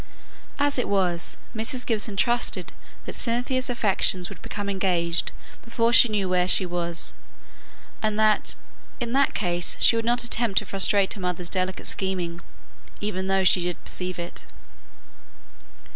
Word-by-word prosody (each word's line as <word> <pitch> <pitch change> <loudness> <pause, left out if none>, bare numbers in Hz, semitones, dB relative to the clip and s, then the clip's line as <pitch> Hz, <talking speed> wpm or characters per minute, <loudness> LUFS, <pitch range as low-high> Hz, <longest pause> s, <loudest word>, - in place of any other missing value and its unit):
As 285 -2 +1
it - - -1
was, 180 -4 0 0.2
Mrs. 225 +3 -2
Gibson 215 -2 0
trusted 240 +5 +1 0.3
that - - -6
Cynthia's 255 +2 0
affections 195 -6 +1
would - - -12
become 205 -1 -5
engaged 180 -4 +1 0.3
before 230 0 0
she 245 - +7
knew 205 -3 -1
where 180 -1 +1
she 185 - +4
was, 170 -1 0 0.9
and 215 -1 0
that 215 -1 +2 0.4
in 240 -1 -3
that 275 +1 +2
case 175 -3 0
she - - +6
would 230 - 0
not 240 +1 +2
attempt 235 -4 +1
to - - +3
frustrate 195 0 +2
her 200 - -9
mother's 180 -1 -2
delicate 185 0 -2
scheming, 180 -3 -3 0.6
even 190 -2 -3
though 195 0 +2
she 185 -1 +4
did 175 0 -3
perceive 180 0 -2
it. 170 0 -7
195 Hz, 145 wpm, -24 LUFS, 180-230 Hz, 0.9 s, she